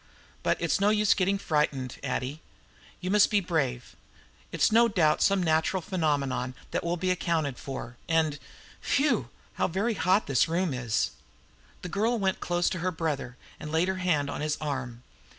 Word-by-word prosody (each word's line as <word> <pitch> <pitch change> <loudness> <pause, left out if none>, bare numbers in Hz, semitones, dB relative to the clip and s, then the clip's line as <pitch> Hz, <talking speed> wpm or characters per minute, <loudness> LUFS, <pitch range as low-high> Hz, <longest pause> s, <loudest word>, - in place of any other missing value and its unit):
But - - +1
it's - - +1
no 200 +1 +4
use 210 -1 +4
getting 195 +1 +1
frightened, 150 -7 -1
Addie; 135 +3 -3 0.6
you 185 0 -2
must 210 0 +5
be 210 - +3
brave. 140 -10 -2 0.6
It's - - +2
no 235 +2 +6
doubt 170 -8 +2
some 195 -2 +3
natural 160 +3 +2
phenomena 145 -8 -1 0.2
that - - -1
will 170 +1 -1
be 185 +1 0
accounted 165 -7 -1
for. 125 -3 -7
And 160 -3 +1 0.4
phew, 250 - +1 0.3
how - - +4
very 205 +7 0
hot 190 +1 +2
this 135 0 +2
room 170 -1 0
is!" 120 -4 0 0.7
The 180 - -5
girl 220 +6 +1
went 190 -3 0
close 175 0 0
to 185 - -3
her 180 +2 0
brother, 150 -7 -3 0.2
and 150 - -7
laid 165 +3 +2
her 190 - -1
hand 170 -6 +1
on 145 - -4
his 150 0 -1
arm. 130 -5 -4
165 Hz, 170 wpm, -28 LUFS, 140-190 Hz, 0.7 s, no